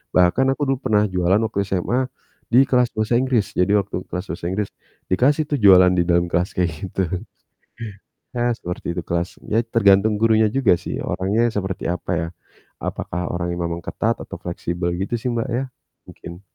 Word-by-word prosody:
Bahkan 90 Hz, +9 st, +4 dB
aku -, -, -9 dB
dulu 130 Hz, -, -5 dB
pernah 105 Hz, -1 st, +4 dB
jualan 90 Hz, +1 st, +2 dB
waktu 110 Hz, -2 st, -2 dB
SMA 120 Hz, +8 st, 0 dB, 0.4 s
di 130 Hz, +3 st, +6 dB
kelas 125 Hz, -2 st, +3 dB
bahasa 110 Hz, +2 st, 0 dB
Inggris. 120 Hz, -6 st, 0 dB
Jadi 90 Hz, +3 st, +3 dB
waktu 95 Hz, -2 st, -2 dB
kelas 90 Hz, +2 st, -4 dB
bahasa 85 Hz, -, -6 dB
Inggris 100 Hz, +1 st, -2 dB, 0.4 s
dikasih, 140 Hz, +10 st, +3 dB
tuh, 145 Hz, -, +1 dB
jualan 90 Hz, -2 st, +8 dB
di 85 Hz, -, +4 dB
dalam 85 Hz, 0 st, +3 dB
kelas 90 Hz, +3 st, 0 dB
kayak 90 Hz, -3 st, +1 dB, 0.2 s
gitu. 95 Hz, -, -1 dB, 1.3 s
Ya 120 Hz, 0 st, +1 dB
seperti 90 Hz, -1 st, -5 dB
itu -, -, 0 dB
kelas. 85 Hz, +1 st, -2 dB
Ya 110 Hz, +2 st, +3 dB
tergantung 105 Hz, -2 st, +3 dB
gurunya 110 Hz, -1 st, +4 dB
juga 130 Hz, -8 st, +3 dB
sih -, -, -5 dB
orangnya 100 Hz, +6 st, 0 dB
seperti 95 Hz, -2 st, -3 dB
apa 90 Hz, +2 st, -3 dB
ya. 85 Hz, 0 st, -2 dB, 0.5 s
Apakah 90 Hz, 0 st, -4 dB
orangnya 85 Hz, 0 st, -2 dB
memang 85 Hz, 0 st, -4 dB
ketat -, -, -1 dB
atau -, -, -8 dB
fleksibel 85 Hz, 0 st, -3 dB
gitu 100 Hz, +5 st, -2 dB
sih, 125 Hz, -, -1 dB
Mbak 120 Hz, +2 st, -2 dB
ya? 125 Hz, +3 st, 0 dB, 0.5 s
Mungkin. 85 Hz, +2 st, -10 dB
95 Hz, 175 wpm, -21 LUFS, 90-115 Hz, 1.3 s, jualan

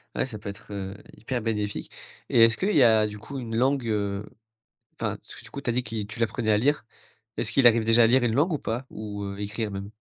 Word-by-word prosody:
Ouais, -, -, +1 dB
ça 115 Hz, -5 st, -6 dB
peut 100 Hz, -, -6 dB
être, 100 Hz, +1 st, -10 dB
heu, 95 Hz, -1 st, -5 dB, 0.2 s
hyper 120 Hz, +1 st, -3 dB
bénéfique, 105 Hz, -2 st, -2 dB, 0.4 s
et 115 Hz, -, +6 dB
est-ce 115 Hz, -1 st, +1 dB
qu'il 200 Hz, +2 st, 0 dB
y 140 Hz, -, +7 dB
a, 110 Hz, -2 st, +5 dB
du 105 Hz, 0 st, -7 dB
coup, 135 Hz, +6 st, -8 dB
une 115 Hz, -3 st, -5 dB
langue, 130 Hz, +2 st, +2 dB
heu, 100 Hz, -1 st, -1 dB, 0.7 s
enfin, -, -, -3 dB
parce -, -, -13 dB
que, -, -, -12 dB
du -, -, -12 dB
coup, -, -, -5 dB
tu -, -, -3 dB
as -, -, +2 dB
dit 125 Hz, +1 st, 0 dB
qui 105 Hz, -2 st, -4 dB
tu 110 Hz, +2 st, -9 dB
l'apprenais 115 Hz, 0 st, 0 dB
à 105 Hz, -, +4 dB
lire, 140 Hz, +4 st, +1 dB, 0.5 s
est-ce -, -, -1 dB
qu'il 135 Hz, -3 st, +6 dB
arrive 115 Hz, -1 st, +4 dB
déjà 115 Hz, +1 st, +6 dB
à -, -, +6 dB
lire 125 Hz, +2 st, +4 dB
une 115 Hz, -2 st, +1 dB
langue 160 Hz, +4 st, +3 dB
ou 150 Hz, -, -1 dB
pas, 120 Hz, +4 st, -3 dB
ou, 105 Hz, -1 st, -6 dB
heu, 100 Hz, 0 st, -6 dB
écrire 105 Hz, +1 st, -3 dB
même? 100 Hz, +1 st, -6 dB
115 Hz, 265 wpm, -26 LUFS, 105-125 Hz, 0.7 s, y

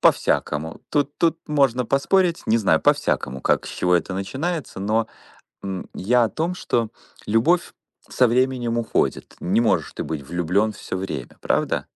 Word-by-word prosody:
По-всякому. 75 Hz, +2 st, +1 dB
Тут 145 Hz, -1 st, 0 dB
тут 165 Hz, -1 st, +2 dB
можно 135 Hz, -5 st, +2 dB
поспорить. 170 Hz, +6 st, +2 dB
Не 115 Hz, +1 st, +3 dB
знаю, 95 Hz, -7 st, +3 dB
по-всякому, 65 Hz, +1 st, +1 dB
как, -, -, +1 dB
с -, -, -6 dB
чего 90 Hz, 0 st, +1 dB
это 90 Hz, +2 st, 0 dB
начинается. 135 Hz, -, -3 dB
Но, 110 Hz, +3 st, +1 dB, 0.6 s
м, 95 Hz, -2 st, -5 dB
я 120 Hz, +6 st, +2 dB
о -, -, -2 dB
том, 165 Hz, +3 st, -2 dB
что 115 Hz, -10 st, -1 dB, 0.4 s
любовь 155 Hz, +12 st, +2 dB, 0.4 s
со 125 Hz, -, +3 dB
временем 120 Hz, -1 st, +1 dB
уходит. 115 Hz, -1 st, -1 dB
Не 100 Hz, +6 st, +1 dB
можешь 115 Hz, -, +1 dB
ты -, -, -3 dB
быть 80 Hz, -3 st, -4 dB
влюблен 90 Hz, +5 st, +1 dB
всё 95 Hz, -, -6 dB
время, 90 Hz, -10 st, -5 dB
правда? -, -, 0 dB
115 Hz, 155 wpm, -23 LUFS, 95-140 Hz, 0.6 s, Не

